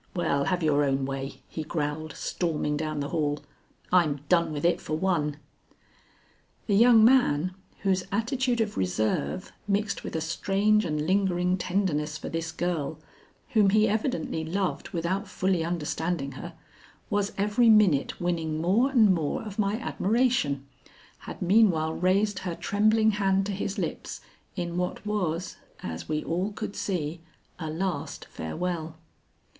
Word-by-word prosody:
Well, 140 -5 +1
have 180 -2 0
your 145 -2 +3
own 135 -1 +1
way," 135 0 -5
he 160 - -5
growled, 155 0 -3
storming 155 -4 -1
down 155 -1 -2
the 140 - -3
hall; 150 -3 -1 0.5
"I'm 155 -6 +3
done 170 -2 +3
with 150 +1 -3
it 175 - +2
for 155 - -2
one." 155 -5 0 1.3
The 205 - 0
young 225 +1 +7
man, 185 - +4 0.3
whose 190 -2 +2
attitude 240 +3 0
of 210 -2 -2
reserve, 110 - -1 0.2
mixed 200 0 0
with - - -6
a - - +1
strange 200 +6 +1
and 150 -2 -1
lingering 180 -1 +2
tenderness 170 -5 -1
for - - -6
this 165 0 -3
girl, 165 -4 -2 0.5
whom 210 -3 +4
he 215 +2 +4
evidently 220 - -1
loved 175 -2 -2
without 185 +4 -2
fully 185 -2 0
understanding 165 -2 -2
her, 170 +5 -8 0.6
was 205 0 +1
every 210 +4 +3
minute 205 -10 +4
winning 165 -3 -1
more 200 - +3
and 225 -8 +5
more 160 -5 -1
of 210 -1 -8
my 200 0 +2
admiration, 225 - +1 0.5
had - - -7
meanwhile 175 -5 +4
raised 195 +3 +1
her 175 -2 -4
trembling 215 +3 +3
hand 195 -2 +1
to 205 - -2
his 200 0 -3
lips - - -4 0.4
in 175 -2 -3
what 180 +3 -2
was, 180 -5 -2 0.3
as 80 - -6
we 155 0 -1
all 180 +5 -1
could 200 - -5
see, 170 -4 -2 0.4
a 160 -3 -4
last 180 +4 -3
farewell. 160 - -4
180 Hz, 145 wpm, -27 LUFS, 155-205 Hz, 1.3 s, young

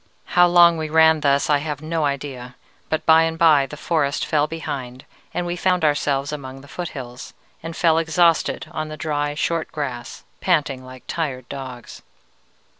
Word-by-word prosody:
"How 175 0 +6
long 175 -1 +6
we 155 -1 -3
ran 160 0 +5
thus, 140 -1 +2
I 145 -1 +3
have 150 -1 -4
no 160 -1 -1
idea, 135 -3 -4 0.3
but 155 - -1
by 160 0 +7
and 165 0 0
by 155 -5 +5
the 150 - -9
forest 150 -3 0
fell 150 -1 +1
behind, 135 -5 -6 0.3
and 175 - -2
we 175 0 -2
found 180 -1 +1
ourselves 145 -1 0
among 135 -2 -7
the 140 - -15
foothills, 135 -7 -7 0.3
and 165 0 -7
fell 165 -2 +3
exhausted 165 +1 +2
on 155 0 -4
the 155 0 -8
dry 145 -1 -2
short 165 +2 -1
grass, 125 -6 -5 0.2
panting 145 -7 0
like 130 0 -12
tired 130 -7 -3
dogs. 130 -3 -8
150 Hz, 170 wpm, -22 LUFS, 140-165 Hz, 0.3 s, by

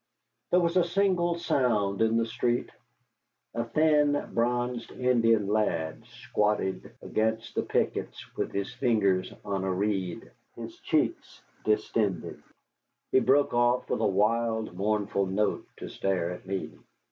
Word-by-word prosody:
There 180 - +4
was 170 0 +1
a 180 - +5
single 175 -1 +1
sound 110 - +1
in 110 0 +3
the 115 - +2
street. 120 +1 -1 0.8
A 115 - -1
thin, 150 +2 +2
bronzed 120 0 0
Indian 115 -4 +2
lad 100 -7 -1
squatted 105 -2 -1
against 110 +1 -1
the - - 0
pickets - - -2
with - - -2
his 100 +3 -3
fingers 105 -7 +1
on 100 -2 -2
a 95 - 0
reed, 95 -2 -2 0.2
his - - -9
cheeks - - -1 0.2
distended. 105 -4 0 0.7
He - - +5
broke 135 +3 +3
off 120 +1 +2
with - - 0
a 110 - +3
wild, 110 +2 +1
mournful 100 0 0
note 105 +3 -1
to - - -7
stare 90 -3 -1
at 90 - -9
me. 95 0 -3
110 Hz, 135 wpm, -28 LUFS, 100-125 Hz, 0.8 s, a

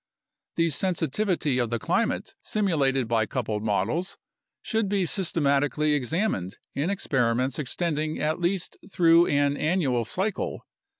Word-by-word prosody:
The 165 -1 +2
sensitivity 165 -3 0
of 120 -2 0
the 120 - 0
climate - - -1
simulated 140 - +1
by 110 -2 +1
coupled 110 -4 -2
models 110 - -1 0.5
should 220 -3 0
be 195 -2 +1
systematically 150 -4 +1
examined 145 - -1 0.2
in 145 +6 -1
experiments 130 -8 0
extending 155 +2 -2
at 155 +3 0
least 175 +1 -1
through 170 -1 +5
an 145 0 +2
annual 150 -8 +1
cycle. 190 - -3
150 Hz, 120 wpm, -26 LUFS, 130-180 Hz, 0.5 s, through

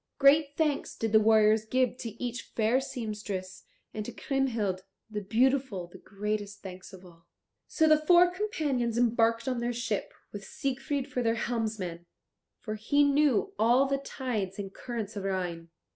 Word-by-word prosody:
Great 285 +1 +4
thanks 300 -3 0
did 225 -1 -2
the 220 - +7
warriors 215 0 +4
give 250 +3 +1
to 235 - -6
each 245 0 -3
fair 225 +3 +3
seamstress, 210 -7 -5 0.3
and 215 - -3
to - - -6
Kriemhild 230 -9 -1 0.3
the 210 -1 -3
beautiful 235 -2 +1
the 175 - -14
greatest 205 0 -4
thanks 185 0 -9
of 190 -1 -13
all. 170 -1 -18 0.4
So 320 - +2
the 310 0 +4
four 350 +2 +6
companions 295 - -1
embarked 230 -1 +2
on 255 -2 0
their 240 +1 -1
ship, 230 -3 -2 0.2
with 205 -1 -7
Siegfried 270 +4 -3
for 250 - -2
their 230 -1 +1
helmsman, 215 -8 -3 0.5
for 215 - -4
he 285 +7 +2
knew 285 - +2
all 240 +4 +5
the 275 0 0
tides 230 -9 -4
and 195 -1 -6
currents 225 -3 -5
of 200 - -4
Rhine. 175 -4 -3
230 Hz, 160 wpm, -29 LUFS, 205-270 Hz, 0.5 s, the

